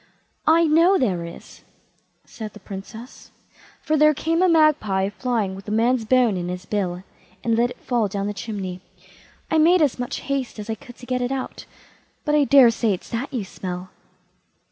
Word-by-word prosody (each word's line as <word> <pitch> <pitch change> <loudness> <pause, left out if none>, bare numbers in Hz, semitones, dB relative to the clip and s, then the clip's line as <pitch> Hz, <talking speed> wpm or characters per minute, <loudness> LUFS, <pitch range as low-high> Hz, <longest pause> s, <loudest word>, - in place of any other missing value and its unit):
"I 325 +2 +5
know 335 +5 +4
there 185 - 0
is", 170 - -12 0.6
said 215 -2 -8
the 210 - -12
Princess, 210 +6 -10 0.5
"for 310 -1 +1
there 305 0 +5
came 330 +4 0
a 370 - +4
magpie 280 - +3
flying 220 -3 -2
with 195 +1 -10
a - - -4
man's 230 +2 +2
bone 240 -4 +3
in 175 -1 -3
his 180 0 -5
bill, 185 -3 -2 0.4
and 230 -1 +1
let 240 +2 +2
it - - -10
fall 235 -4 0
down 200 0 -3
the 205 - -2
chimney. 195 -3 -5 0.7
I 320 - +3
made 345 +4 +5
as 275 -4 0
much 245 - -4
haste 275 -4 -3
as 210 +1 -5
I - - 0
could 240 +3 -12
to 245 - -12
get 250 0 -1
it 245 +1 -1
out, 270 -1 -5 0.6
but 300 - +1
I 295 -1 +4
daresay 235 -6 +5
it's - - -13
that 235 +4 -3
you 245 -6 -2
smell." 180 -1 -7
235 Hz, 190 wpm, -23 LUFS, 195-275 Hz, 0.7 s, I